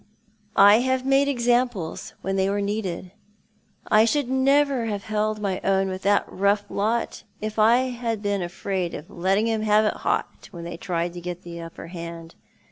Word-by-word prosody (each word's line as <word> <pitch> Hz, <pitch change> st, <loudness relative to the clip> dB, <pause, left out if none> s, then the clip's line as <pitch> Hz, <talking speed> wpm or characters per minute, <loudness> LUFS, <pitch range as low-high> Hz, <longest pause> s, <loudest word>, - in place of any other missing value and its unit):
I 205 Hz, +2 st, +8 dB
have 260 Hz, +1 st, 0 dB
made 275 Hz, +1 st, +3 dB
ex 240 Hz, -4 st, -2 dB
amples 240 Hz, -9 st, 0 dB
when 195 Hz, 0 st, -1 dB
they 190 Hz, 0 st, +1 dB
were 200 Hz, +1 st, 0 dB
needed. 200 Hz, -3 st, -3 dB, 0.7 s
I 215 Hz, +1 st, +5 dB
should 280 Hz, +2 st, 0 dB
never 270 Hz, -2 st, +3 dB
have 205 Hz, -2 st, -3 dB
held 215 Hz, 0 st, -1 dB
my 195 Hz, -3 st, -2 dB
own 195 Hz, 0 st, +2 dB
with 185 Hz, 0 st, -5 dB
that 205 Hz, +1 st, +2 dB
rough 200 Hz, +2 st, +1 dB
lot 220 Hz, +4 st, -1 dB, 0.2 s
if 215 Hz, +1 st, -4 dB
I 240 Hz, +4 st, +4 dB
had 230 Hz, -3 st, -3 dB
been 205 Hz, -1 st, 0 dB
afraid 180 Hz, 0 st, -3 dB
of 150 Hz, -, -9 dB
letting 195 Hz, +5 st, +1 dB
'oni 220 Hz, -1 st, -1 dB
have 215 Hz, 0 st, +4 dB
it 210 Hz, -, 0 dB
hot -, -, -2 dB
when 170 Hz, -1 st, -9 dB
they 170 Hz, 0 st, -6 dB
tried 170 Hz, -1 st, -2 dB
to 175 Hz, -, -7 dB
get 180 Hz, +1 st, -6 dB
the 170 Hz, -1 st, -8 dB
upper 165 Hz, 0 st, -9 dB
hand. 170 Hz, -1 st, -8 dB
205 Hz, 185 wpm, -24 LUFS, 180-230 Hz, 0.7 s, I